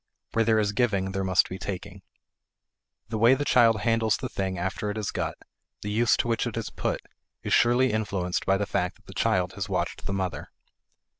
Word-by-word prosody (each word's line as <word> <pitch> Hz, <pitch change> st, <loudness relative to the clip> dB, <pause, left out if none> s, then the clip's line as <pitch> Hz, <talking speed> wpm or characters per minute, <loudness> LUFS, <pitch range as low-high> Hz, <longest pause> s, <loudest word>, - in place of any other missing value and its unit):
Where 115 Hz, -, +2 dB
there 110 Hz, 0 st, +3 dB
is 105 Hz, -2 st, +2 dB
giving 100 Hz, -5 st, 0 dB
there 95 Hz, 0 st, -2 dB
must 95 Hz, -1 st, +3 dB
be 95 Hz, -, -7 dB
taking. 100 Hz, 0 st, -6 dB, 1.1 s
The 110 Hz, -1 st, -2 dB
way 120 Hz, +4 st, +6 dB
the 145 Hz, +2 st, -2 dB
child 115 Hz, -5 st, +4 dB
handles 115 Hz, -2 st, +2 dB
the -, -, -5 dB
thing 95 Hz, -1 st, -3 dB
after 95 Hz, +4 st, -2 dB
it 105 Hz, -, -4 dB
is 105 Hz, -3 st, -2 dB
got, -, -, -2 dB, 0.5 s
the 105 Hz, -, -3 dB
use 115 Hz, +2 st, +3 dB
to -, -, 0 dB
which 115 Hz, -1 st, 0 dB
it -, -, -5 dB
is -, -, -4 dB
put, -, -, -2 dB, 0.4 s
is -, -, -1 dB
surely 120 Hz, 0 st, +4 dB
influenced 95 Hz, -5 st, -1 dB
by 95 Hz, 0 st, +4 dB
the 100 Hz, -, -1 dB
fact 90 Hz, -1 st, -1 dB
that -, -, -27 dB
the -, -, -11 dB
child 90 Hz, -1 st, +1 dB
has 95 Hz, +1 st, -4 dB
watched 95 Hz, -, -2 dB
the 100 Hz, -, -2 dB
mother. 90 Hz, -6 st, -3 dB
100 Hz, 210 wpm, -26 LUFS, 95-115 Hz, 1.1 s, way